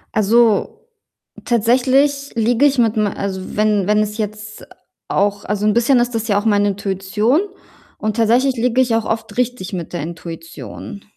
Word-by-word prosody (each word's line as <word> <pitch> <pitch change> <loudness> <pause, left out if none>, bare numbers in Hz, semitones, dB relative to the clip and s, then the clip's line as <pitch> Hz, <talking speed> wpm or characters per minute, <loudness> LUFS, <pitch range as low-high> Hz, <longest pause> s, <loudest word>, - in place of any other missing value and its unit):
Also, 230 - +2 0.6
tatsächlich 260 +5 +2
liege 235 +4 +2
ich 280 -2 +3
mit 225 -2 +2
me 210 -2 0
also, 190 0 -5
wenn 210 -3 +2
wenn 210 0 +3
es 210 +1 -1
jetzt 215 0 -6 0.4
auch 200 0 0
also, 210 0 -2
'n 210 - +3
bisschen 240 +2 +3
ist 240 -1 0
das 225 0 -2
ja 200 - +3
auch 205 - -7
meine 205 -1 +3
Intuition, 200 - 0 0.6
und 215 0 -2
tatsächlich 245 +4 +2
liege 245 +2 0
ich 240 -3 +1
auch 225 - +1
oft 220 -2 -3
richtig 250 -6 -2
mit 175 -3 -5
der 175 -4 -4
Intuition. 165 +4 -8
215 Hz, 165 wpm, -18 LUFS, 205-240 Hz, 0.6 s, ich